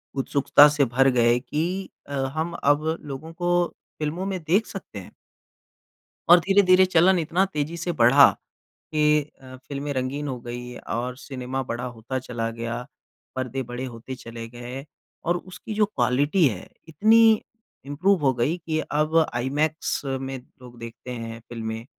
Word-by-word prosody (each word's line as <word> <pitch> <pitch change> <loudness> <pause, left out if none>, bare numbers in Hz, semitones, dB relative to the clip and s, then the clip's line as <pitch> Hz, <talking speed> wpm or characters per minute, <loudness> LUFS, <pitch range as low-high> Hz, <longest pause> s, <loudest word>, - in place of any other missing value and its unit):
उत्सुकता 140 +2 +5
से 145 -2 +2
भर 135 +3 +3
गए 120 0 +3
कि 175 +8 -3 0.2
अ, 145 - -7
हम 150 +5 -2
अब 145 +2 +3 0.2
लोगों 150 +3 -8
को 175 0 +1 0.3
फ़िल्मों 160 +5 -2
में 190 -2 -2
देख 190 +8 +2
सकते 180 - -8
हैं। 90 - -12 1.2
और 175 +1 +9
धीरे-धीरे 190 0 +5
चलन 180 +1 +4
इतना 170 +4 +1
तेज़ी 150 +3 -2
से 170 +1 -2
बढ़ा 135 +1 +7 0.6
कि 150 0 +4 0.2
अ, 130 0 -11
फ़िल्में 140 +2 -5
रंगीन 135 +3 -2
हो 125 -2 -4
गई 120 0 -7
और 125 +2 -4
सिनेमा 130 -1 -4
बड़ा 120 0 -4
होता 125 +2 -5
चला 115 -3 -4
गया, 115 +2 -5 0.5
पर्दे 130 +1 -2
बड़े 120 +1 -6
होते 125 +1 -7
चले 115 -2 -9
गए 120 +3 -8 0.4
और 175 +1 +1
उसकी 185 +4 -9
जो 210 0 +3
क्वालिटी 145 +2 +2
है 100 -5 -7 0.2
इतनी 220 +6 +5 0.4
इम्प्रूव 175 +6 +2
हो 135 -2 +4
गई 130 +8 0
कि 155 -1 0
अब 155 +2 +1 0.2
आईमैक्स 145 +6 -1
में 135 0 -3 0.2
लोग 120 -1 -13
देखते 115 +2 -9
हैं 115 -1 -6
फ़िल्में। 115 -1 -5
140 Hz, 155 wpm, -24 LUFS, 125-165 Hz, 1.2 s, और